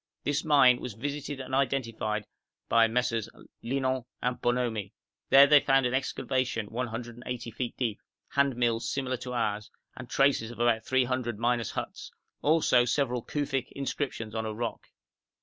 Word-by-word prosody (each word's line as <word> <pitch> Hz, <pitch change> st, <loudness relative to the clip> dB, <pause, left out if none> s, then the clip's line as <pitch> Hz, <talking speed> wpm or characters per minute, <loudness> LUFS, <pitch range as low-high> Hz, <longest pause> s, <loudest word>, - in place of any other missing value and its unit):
This 145 Hz, +1 st, 0 dB
mine 140 Hz, -5 st, +5 dB
was 125 Hz, -5 st, -6 dB
visited 145 Hz, +3 st, -4 dB
and 130 Hz, 0 st, -7 dB
identified 115 Hz, -6 st, 0 dB, 0.4 s
by 115 Hz, 0 st, +5 dB
MM. 115 Hz, -1 st, 0 dB, 0.3 s
Linant 130 Hz, 0 st, -1 dB
and 125 Hz, +1 st, -2 dB
Bonomi; 120 Hz, -5 st, -1 dB, 0.4 s
there 140 Hz, +1 st, +9 dB
they 145 Hz, +1 st, +7 dB
found 135 Hz, -2 st, +3 dB
an 125 Hz, -, 0 dB
excavation 130 Hz, -3 st, -1 dB
180 120 Hz, 0 st, -5 dB
feet 120 Hz, +2 st, -4 dB
deep, 115 Hz, -5 st, -2 dB, 0.3 s
handmills 120 Hz, -5 st, +1 dB
similar 130 Hz, -2 st, -2 dB
to 125 Hz, +1 st, -6 dB
ours, 105 Hz, -3 st, -1 dB, 0.3 s
and 130 Hz, -2 st, -9 dB
traces 135 Hz, -5 st, +2 dB
of 120 Hz, -, -10 dB
about 120 Hz, -2 st, +2 dB
three 130 Hz, 0 st, +3 dB
hundred 125 Hz, -3 st, -2 dB
miners' 120 Hz, 0 st, 0 dB
huts, -, -, -6 dB, 0.3 s
also 150 Hz, -5 st, +4 dB
several 125 Hz, 0 st, 0 dB
Kufic 135 Hz, -3 st, -2 dB
inscriptions 130 Hz, -5 st, -3 dB
on 110 Hz, -1 st, -2 dB
a 110 Hz, -1 st, -4 dB
rock. 120 Hz, +1 st, -4 dB
125 Hz, 150 wpm, -29 LUFS, 115-135 Hz, 0.4 s, there